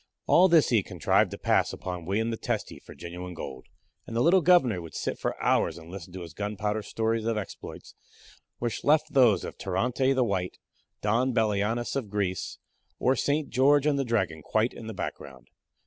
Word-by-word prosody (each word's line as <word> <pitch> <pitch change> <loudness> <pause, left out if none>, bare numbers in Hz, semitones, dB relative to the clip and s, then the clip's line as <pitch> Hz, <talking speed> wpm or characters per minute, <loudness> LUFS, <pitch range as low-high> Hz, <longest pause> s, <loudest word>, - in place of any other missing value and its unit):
All 185 +2 +6
this 165 -4 +5
he 120 - +4
had 100 - 0
contrived 90 -5 +2
to - - -7
pass - - +2
off - - -8
upon 90 -2 -5
William 110 +5 0
the - - -1
Testy - - -3
for - - -14
genuine 90 +1 -7
gold; 65 -5 -8 0.4
and 115 - -6
the 115 - +2
little 180 +3 +5
Governor 145 - +4
would 80 -1 -10
sit - - -3
for - - -3
hours 80 - +1
and 85 0 -12
listen 90 -2 -8
to 95 - -7
his 85 -2 -9
gunpowder 105 +1 -2
stories 110 +1 -1
of 115 -1 0
exploits, 105 - -8 0.6
which 120 -2 -3
left 155 +1 +3
those 120 -8 +5
of - - -7
Tirante 125 +8 0
the 130 - +3
White, 95 -5 -2 0.5
Don 120 +4 +1
Belianis 110 +3 0
of 130 -7 -2
Greece, 95 -3 -2 0.4
or 130 +2 +2
St. 145 0 0
George 140 +2 +4
and 145 -2 +2
the - - +1
Dragon 95 -10 -1
quite 110 - 0
in 110 - -9
the 110 - -6
background. 65 -8 -7
110 Hz, 195 wpm, -27 LUFS, 90-130 Hz, 0.6 s, All